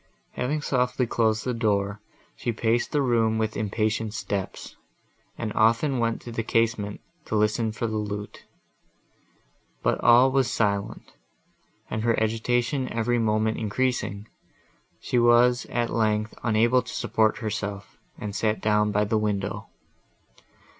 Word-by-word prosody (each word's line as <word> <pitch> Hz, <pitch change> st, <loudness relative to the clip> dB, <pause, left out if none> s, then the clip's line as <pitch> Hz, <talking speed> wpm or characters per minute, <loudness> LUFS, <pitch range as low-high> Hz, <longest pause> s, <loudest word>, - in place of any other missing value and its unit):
Having 145 Hz, +4 st, -2 dB
softly 125 Hz, -2 st, +1 dB
closed 110 Hz, -1 st, +1 dB
the 125 Hz, -, 0 dB
door, 105 Hz, -3 st, 0 dB, 0.3 s
she 120 Hz, -, -2 dB
paced 115 Hz, +1 st, 0 dB
the 145 Hz, -2 st, +1 dB
room 115 Hz, -3 st, +2 dB
with 110 Hz, 0 st, -1 dB
impatient 110 Hz, +1 st, -1 dB
steps, 100 Hz, -3 st, -4 dB, 0.6 s
and 110 Hz, -2 st, -3 dB
often 115 Hz, +5 st, +2 dB
went 115 Hz, -1 st, 0 dB
to 120 Hz, -, -8 dB
the 115 Hz, -, -2 dB
casement 115 Hz, -2 st, 0 dB, 0.2 s
to -, -, -3 dB
listen 110 Hz, +1 st, +1 dB
for 110 Hz, +2 st, -4 dB
the 110 Hz, -1 st, -2 dB
lute; 105 Hz, 0 st, -5 dB, 1.4 s
but -, -, +1 dB
all 125 Hz, +3 st, +6 dB
was 130 Hz, -2 st, +2 dB
silent, 100 Hz, -4 st, -2 dB, 0.7 s
and, 110 Hz, -, -3 dB
her 115 Hz, 0 st, +2 dB
agitation 120 Hz, +4 st, 0 dB
every 120 Hz, +1 st, 0 dB
moment 110 Hz, 0 st, +1 dB
increasing, 110 Hz, -2 st, -2 dB, 0.7 s
she 125 Hz, -, 0 dB
was 120 Hz, +1 st, +4 dB
at 120 Hz, -1 st, -1 dB
length 110 Hz, -1 st, 0 dB
unable 115 Hz, +2 st, +3 dB
to -, -, -9 dB
support 110 Hz, -1 st, +1 dB
herself, 105 Hz, -2 st, -5 dB, 0.2 s
and 105 Hz, -1 st, -6 dB
sat 110 Hz, -1 st, 0 dB
down 105 Hz, 0 st, +2 dB
by 105 Hz, +1 st, +2 dB
the 110 Hz, +1 st, +1 dB
window. 100 Hz, -2 st, -2 dB
110 Hz, 135 wpm, -25 LUFS, 105-120 Hz, 1.4 s, all